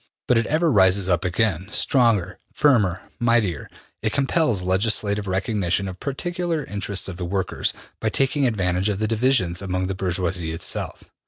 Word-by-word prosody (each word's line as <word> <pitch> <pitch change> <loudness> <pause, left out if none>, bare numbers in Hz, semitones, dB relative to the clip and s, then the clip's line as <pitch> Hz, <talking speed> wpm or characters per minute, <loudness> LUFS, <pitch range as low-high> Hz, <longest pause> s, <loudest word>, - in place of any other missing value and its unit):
But 125 - +4
it 115 - -1
ever 160 +1 +2
rises 95 -3 +4
up 90 - +1
again, 95 -1 0
stronger, 105 - +2
firmer, 110 - +2 0.2
mightier. 115 -10 +1 0.3
It 110 - 0
compels 135 - +1
legislative 100 +2 +1
recognition 95 0 0
of 95 -1 -7
particular 170 +3 -3
interests 100 -2 -2
of 95 -3 -7
the 90 - -5
workers, 95 +1 -1 0.3
by - - 0
taking 135 0 +1
advantage 95 -3 0
of 100 - -1
the 110 +1 -1
divisions 110 -6 +1
among 95 -1 -2
the 95 - -2
bourgeoisie 90 -3 -2
itself.'' 80 - -4
100 Hz, 155 wpm, -23 LUFS, 90-120 Hz, 0.3 s, But